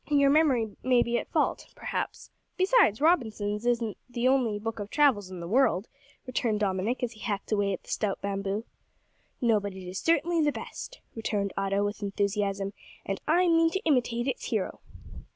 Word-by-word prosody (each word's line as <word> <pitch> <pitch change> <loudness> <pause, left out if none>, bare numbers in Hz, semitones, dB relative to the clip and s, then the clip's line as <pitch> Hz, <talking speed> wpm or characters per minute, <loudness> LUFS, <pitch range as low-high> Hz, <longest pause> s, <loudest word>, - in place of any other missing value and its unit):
"Your 280 -2 +4
memory 265 -9 +3
may 250 -1 +4
be 235 0 0
at - - -8
fault, - - 0
perhaps. - - -4 0.3
Besides, 370 - +4
Robinson's 220 -9 +1
is 240 -1 +2
not 215 -4 -4
the 245 0 0
only 255 -5 +2
book 225 +1 -4
of 205 0 -5
travels 260 -10 +3
in 185 -2 -7
the 170 - -5
world," 215 -3 +2 0.4
returned 235 -4 0
Dominick, 200 +5 0
as 240 - 0
he 220 - -14
hacked 205 -3 -3
away 205 -2 +2
at 190 - -4
the - - -17
stout 205 -3 -1
bamboo. 200 +2 -2 0.8
"No; 230 -3 +4
but 200 -1 -5
it 185 -1 -8
is 185 +2 -4
certainly 335 +1 +2
the 295 -1 +3
best," - - -8
returned 205 -3 -2
Otto, 195 +1 0
with 205 +1 -4
enthusiasm, 200 0 -1 0.3
"and 195 - -3
I 350 +4 +4
mean 330 -1 +4
to 385 - -1
imitate 245 -4 +1
its - - -2
hero." - - -2
225 Hz, 185 wpm, -28 LUFS, 200-270 Hz, 0.8 s, Your